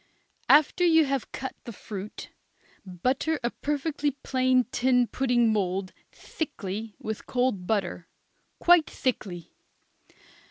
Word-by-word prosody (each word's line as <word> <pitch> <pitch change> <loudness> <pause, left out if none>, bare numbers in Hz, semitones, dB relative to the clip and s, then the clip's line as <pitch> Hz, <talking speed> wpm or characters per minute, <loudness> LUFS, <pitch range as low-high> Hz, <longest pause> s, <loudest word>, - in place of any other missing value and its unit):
After 305 +4 +5
you 325 -2 +5
have 275 -2 -2
cut 265 - -5
the 235 - -7
fruit, 205 -1 -8 0.5
butter 255 - -1
a 240 - 0
perfectly 295 0 -1
plain 255 -1 +3
tin 250 -1 +3
pudding 240 -3 +2
mould 190 -2 -1 0.2
thickly 220 - -5
with 220 -1 -6
cold 245 -8 0
butter, 200 -5 -1 0.5
quite 345 -2 +5
thickly. 190 - -3
245 Hz, 110 wpm, -27 LUFS, 205-275 Hz, 0.5 s, After